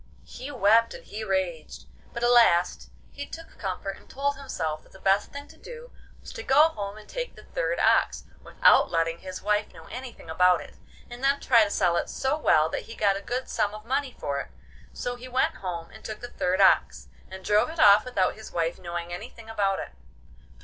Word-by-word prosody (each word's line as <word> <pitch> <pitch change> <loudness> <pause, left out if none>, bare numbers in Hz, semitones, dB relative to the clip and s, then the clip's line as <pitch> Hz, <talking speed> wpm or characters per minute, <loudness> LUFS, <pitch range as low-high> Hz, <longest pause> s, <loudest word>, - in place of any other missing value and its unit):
He 265 - -8
wept 230 -3 +3
and - - -12
he 215 +1 -6
raged, 180 - -3 0.3
but 235 - -5
at 240 - +4
last 180 -8 +4 0.2
he 285 0 -7
took 330 0 -11
comfort 195 0 -4
and - - -20
told 280 +1 -1
himself 160 - -4
that - - -23
the 190 - -14
best 195 +2 +2
thing 285 +1 -8
to - - -16
do 485 0 -11 0.3
was - - -10
to 485 - -6
go 300 - +5
home 205 -7 -6
and 215 - -13
take - - -5
the - - -14
third - - -2
ox, - - +3 0.2
without - - +4
letting 165 0 0
his 185 -1 -8
wife 210 +1 0
know - - -14
anything 250 -7 -8
about 180 +2 +4
it, - - -11 0.3
and 240 +2 -10
then 275 +1 +3
try 235 -5 +5
to 205 - -1
sell 175 -4 +1
it - - -2
so 265 +2 -1
well 155 - +3
that - - -4
he 230 - -10
got 200 -2 +2
a 200 - -5
good 250 +4 -3
sum 205 0 -1
of 215 0 -11
money 265 +1 -2
for 140 0 -2
it. - - -5 0.4
So 245 0 -4
he 250 +1 -10
went 255 +1 0
home 170 -3 -6
and - - -14
took 215 - -6
the 245 - -7
third 185 -4 -1
ox, 65 - +3 0.2
and 190 0 -10
drove 210 +7 +3
it 325 0 -8
off 205 -3 +7
without 225 -7 0
his 220 - -11
wife 165 0 -1
knowing 175 -1 -5
anything 225 +3 -9
about 195 -3 +1
it. - - -6
210 Hz, 220 wpm, -26 LUFS, 185-255 Hz, 0.4 s, off